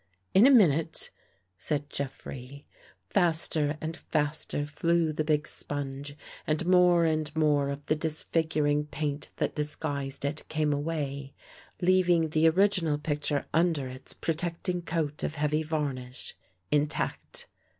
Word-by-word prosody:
" 95 0 -45
In 210 +7 +7
a - - +6
minute," 165 - +4 0.5
said 145 - 0
Jeffrey. 135 0 -6 0.5
Faster 160 -4 +4
and 160 +1 -4
faster 150 -2 -2
flew 165 +1 0
the 155 - -1
big 150 0 0
sponge 145 0 -1 0.3
and 155 +2 0
more 180 -1 +5
and 155 -2 0
more 145 -3 +2
of 140 +1 -6
the - - +1
disfiguring 155 -1 0
paint 145 -1 -4
that - - -1
disguised 145 -2 -3
it 150 +2 -4
came 155 -1 0
away, 140 -2 -4 0.5
leaving 175 -3 +3
the 155 +1 +4
original 180 -4 +2
picture 145 -1 0
under 165 -5 +1
its 130 +1 -6
protecting 170 +2 -1
coat 160 -3 -2
of 150 - -3
heavy 150 +1 0
varnish, 140 -5 -3 0.4
intact. 150 0 0
150 Hz, 130 wpm, -28 LUFS, 145-165 Hz, 0.5 s, In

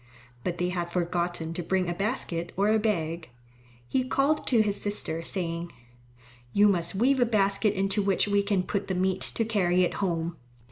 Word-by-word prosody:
But 175 -1 -2
they 180 +1 0
had 175 -1 -3
forgotten 175 -1 -1
to 175 - -3
bring 185 +1 0
a 175 - -1
basket 175 -4 -2
or 200 +2 +3
a 220 0 +4
bag. 170 - -1 0.6
He 260 - +1
called 275 +4 +1
to 230 -4 +4
his 205 -1 -1
sister 205 -5 -2
saying, 170 -2 -3 0.8
"You 205 +1 +5
must 180 -1 0
weave 260 +6 +3
a 245 - +5
basket 200 -1 +2
into 195 +2 +1
which 195 0 +2
we 205 0 +3
can 200 -2 0
put 200 +2 -2
the 190 - -1
meat 185 +1 0
to 225 - -2
carry 185 -5 +2
it 175 - 0
home." 170 -3 -1
190 Hz, 185 wpm, -27 LUFS, 175-210 Hz, 0.8 s, You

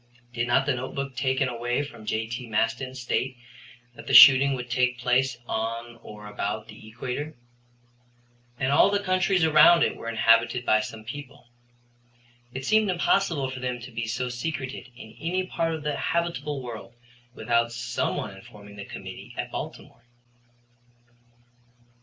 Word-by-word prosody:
Did 120 0 -1
not 135 +3 +3
the 140 - +1
notebook 130 +2 -5
taken 130 +1 +1
away 120 +2 -2
from 115 -7 -11
J.T. 115 +3 -3
Maston 115 +4 -1
state 130 0 -2 0.6
that - - -13
the - - +2
shooting 135 0 +9
would 125 -1 -6
take 125 0 +1
place 125 +2 +1
on 115 +1 -4
or 105 -1 -11
about 105 +1 -4
the 105 0 -13
equator? 130 +7 -5 1.2
And 130 +1 0
all 145 - +5
the 205 0 0
countries 185 -1 +2
around 160 +2 +7
it - - 0
were 115 - -6
inhabited 115 +2 +3
by 110 - +4
some 110 0 -6
people. 140 +1 -10 1.0
It 130 +1 -6
seemed 215 +2 +3
impossible 170 -6 +1
for 130 - -7
them 125 -1 -3
to 120 +2 -10
be 115 0 -4
so 125 +3 -2
secreted 130 +1 -5
in 110 -3 -12
any 180 +4 -1
part 165 -3 -1
of 155 - -8
the 150 -1 -1
habitable 150 -5 -2
world 120 -1 -8 0.4
without 115 0 +1
some 120 0 -2
one - - -5
informing 100 0 -14
the 100 - -7
committee - - -9
at - - -4
Baltimore. 120 - -8
125 Hz, 155 wpm, -26 LUFS, 115-140 Hz, 1.2 s, shooting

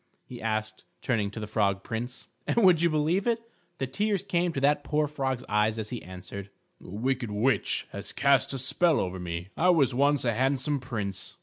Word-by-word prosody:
he 120 -2 -9
asked, 110 -1 -2 0.2
turning 110 -5 +1
to 110 - -7
the 105 - -4
Frog 100 -2 0
Prince. 120 +2 -5 0.2
And, - - 0
would 180 -4 +6
you 170 - +4
believe 160 +7 +1
it, 230 -1 +2 0.4
the 135 - -1
tears 200 +9 0
came 175 -3 +1
to 140 - -3
that 145 +1 +2
poor 150 +1 +1
frog's 135 -4 -2
eyes, 105 +1 +2
as 110 0 -4
he 120 - -4
answered: 95 +2 -8 0.3
"A - - -11
wicked 120 +4 -1
witch 105 +1 +1
has 100 0 -4
cast 140 -1 +3
a 135 - -2
spell 155 +5 +3
over 95 0 -2
me. 85 +1 -5
I 180 +3 +3
was 145 -7 +4
once 140 +1 +2
a 120 - +2
handsome 135 +4 +1
prince." 105 -7 -4
125 Hz, 200 wpm, -28 LUFS, 105-145 Hz, 0.4 s, would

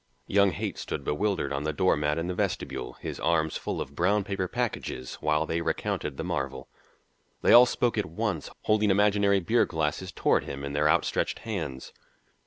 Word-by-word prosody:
Young 100 0 +4
Haight 85 - -4
stood - - -4
bewildered 85 -3 -1
on 70 +1 -2
the 75 - 0
door 95 +5 +2
mat 75 0 0
in 80 - -1
the 90 - -2
vestibule, 60 -7 -3
his - - -5
arms 80 -1 +1
full - - -3
of - - -5
brown 105 0 +2
paper 95 -2 -2
packages, 105 - -3
while 75 +1 +1
they 85 +1 -1
recounted 70 -4 -2
the - - -3
marvel. 70 -1 -3 0.8
They - - +6
all 125 +1 +9
spoke 120 -2 0
at 105 - -1
once, 90 -2 -3
holding 105 -1 +2
imaginary 100 0 +3
beer 110 +7 +2
glasses 80 +3 -2
toward - - +1
him 70 0 -6
in 70 0 -4
their 75 +1 +2
outstretched 85 +2 +1
hands. 80 -12 -5
85 Hz, 185 wpm, -27 LUFS, 75-100 Hz, 0.8 s, all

